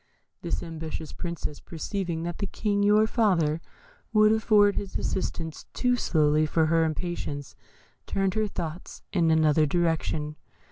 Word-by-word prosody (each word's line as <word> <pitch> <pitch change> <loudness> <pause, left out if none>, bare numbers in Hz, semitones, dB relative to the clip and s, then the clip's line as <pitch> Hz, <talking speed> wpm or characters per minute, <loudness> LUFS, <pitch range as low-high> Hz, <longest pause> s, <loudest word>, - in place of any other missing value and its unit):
"This 170 - -3
ambitious 160 -1 -6
Princess, 170 -4 -5
perceiving 170 0 -4
that 175 0 -4
the 200 - -1
King, 205 +1 -1
your 210 +1 +5
father, 175 -9 +2 0.5
would 215 -1 +5
afford 210 -2 +4
his 195 -2 -3
assistance 165 -4 -3
too 250 -1 +2
slowly 155 -7 +2
for 160 +1 +2
her 165 +1 +3
impatience, 155 -3 -4 0.5
turned 195 -1 0
her 215 0 0
thoughts 170 -2 -6
in 170 -4 +3
another 155 -1 +4
direction. 160 -2 0
170 Hz, 135 wpm, -27 LUFS, 155-200 Hz, 0.5 s, your